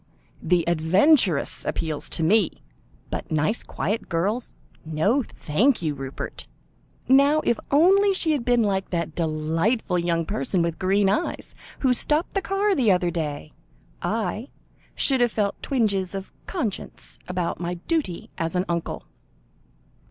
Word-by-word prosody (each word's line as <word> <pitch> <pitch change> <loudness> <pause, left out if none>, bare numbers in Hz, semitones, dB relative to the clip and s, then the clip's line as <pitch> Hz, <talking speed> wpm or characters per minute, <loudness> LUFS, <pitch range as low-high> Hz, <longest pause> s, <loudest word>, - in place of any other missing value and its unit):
The 170 0 +1
adventuress 175 - +3
appealed 155 -2 -2
to 165 - -2
me, 185 - +2 0.5
but - - -4
nice 155 +9 +1
quiet 215 +3 -3
girls 200 +8 -1 0.3
no, 160 - +1
thank 220 - 0
you, 155 -2 0
Rupert! 135 -1 -6 0.6
Now 280 +4 +5
if 235 - +1
only 385 +7 +5
she 330 -4 +1
had 290 -5 0
been 245 -1 +3
like 195 -2 -1
that 170 -3 -2
delightful 165 +6 0
young 170 -1 0
person 200 -2 0
with 170 -1 -2
green 195 +1 +2
eyes, 315 - -1 0.3
who 260 -2 +4
stopped 300 +7 +1
the 390 - 0
car 395 +2 +1
the 245 - +3
other 180 -1 +2
day 150 -3 -4 0.5
I - - -2 0.5
should 265 -3 +2
have 240 -1 +3
felt 205 -2 -1
twinges 200 -8 0
of 195 0 -6 0.2
conscience 245 - -5
about 180 -2 -2
my 175 0 -3
duty 185 - -3
as 165 +1 -2
an 180 +1 +1
uncle." 170 -1 -3
190 Hz, 140 wpm, -24 LUFS, 170-250 Hz, 0.6 s, Now